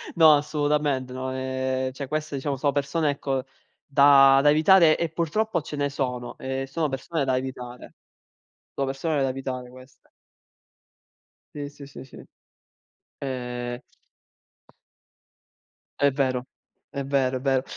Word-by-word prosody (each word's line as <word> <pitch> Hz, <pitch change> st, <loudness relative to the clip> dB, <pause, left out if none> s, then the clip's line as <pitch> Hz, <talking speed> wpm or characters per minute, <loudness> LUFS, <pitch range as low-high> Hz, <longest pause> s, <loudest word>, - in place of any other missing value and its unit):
no, 160 Hz, -2 st, +8 dB
assolutamente, 145 Hz, -3 st, 0 dB
no, 130 Hz, 0 st, -4 dB
ehm, 130 Hz, 0 st, -2 dB
cioè 140 Hz, 0 st, -6 dB
queste 155 Hz, 0 st, -3 dB
diciamo 135 Hz, 0 st, -2 dB
sono 140 Hz, +1 st, 0 dB
persone 145 Hz, +2 st, 0 dB
ecco 135 Hz, -2 st, -2 dB, 0.4 s
da 135 Hz, -1 st, +6 dB
da 145 Hz, -, +6 dB
evitare 160 Hz, +1 st, +6 dB
e 170 Hz, -, 0 dB
purtroppo 170 Hz, +6 st, -1 dB
ce 150 Hz, 0 st, -7 dB
ne 145 Hz, 0 st, 0 dB
sono 125 Hz, -3 st, -4 dB
e 135 Hz, 0 st, -4 dB
sono 155 Hz, +1 st, -1 dB
persone 140 Hz, +3 st, -2 dB
da 130 Hz, -1 st, +1 dB
evitare. 125 Hz, -2 st, -7 dB, 0.8 s
Sono 135 Hz, -, -1 dB
persone 140 Hz, +2 st, -1 dB
da 135 Hz, -, +1 dB
evitare 130 Hz, -1 st, -5 dB
queste. 130 Hz, +1 st, -17 dB, 1.5 s
Sì, 145 Hz, -1 st, -5 dB
sì, 145 Hz, -1 st, -12 dB
sì, -, -, -10 dB
sì. 130 Hz, -, -13 dB, 1.0 s
Ehm 125 Hz, -2 st, -4 dB, 2.2 s
È 140 Hz, 0 st, +4 dB
vero, 130 Hz, -2 st, -1 dB, 0.4 s
è 140 Hz, -, -4 dB
vero, 135 Hz, -2 st, +1 dB
è -, -, -8 dB
vero. 135 Hz, -1 st, +1 dB
135 Hz, 130 wpm, -25 LUFS, 130-145 Hz, 2.2 s, no